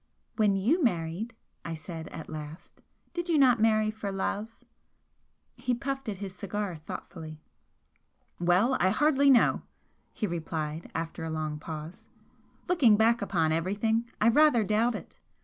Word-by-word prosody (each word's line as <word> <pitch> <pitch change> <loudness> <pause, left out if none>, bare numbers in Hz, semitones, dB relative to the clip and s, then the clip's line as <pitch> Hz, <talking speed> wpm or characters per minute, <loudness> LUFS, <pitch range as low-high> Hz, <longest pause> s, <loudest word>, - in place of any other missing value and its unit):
"When 210 -3 +3
you 260 - +2
married," 180 +2 -1 0.3
I 165 - -4
said, 160 0 -7
at 160 - -8
last 155 +1 -9 0.3
"did 345 0 -3
you 325 - +3
not 255 -4 +5
marry 215 -1 +3
for 215 -2 -5
love?" 200 +3 -2 1.1
He 250 - -1
puffed 270 0 -4
at 200 - -4
his 195 -1 -6
cigar 200 -1 -4
thoughtfully. 155 0 -8 1.0
"Well, 180 +9 +3
I 185 - +4
hardly 280 +5 +3
know," 255 -4 +5 0.5
he - - -3
replied, 160 -3 -4
after 165 0 -4
a 160 - -3
long 155 -1 -3
pause, 160 +8 -8 0.6
"Looking 275 -12 +5
back 230 +2 +3
upon 170 -6 +1
everything, 210 +8 0
I 220 - +5
rather 295 -2 +5
doubt 215 +3 +1
it! - - -10
205 Hz, 145 wpm, -29 LUFS, 165-235 Hz, 1.1 s, not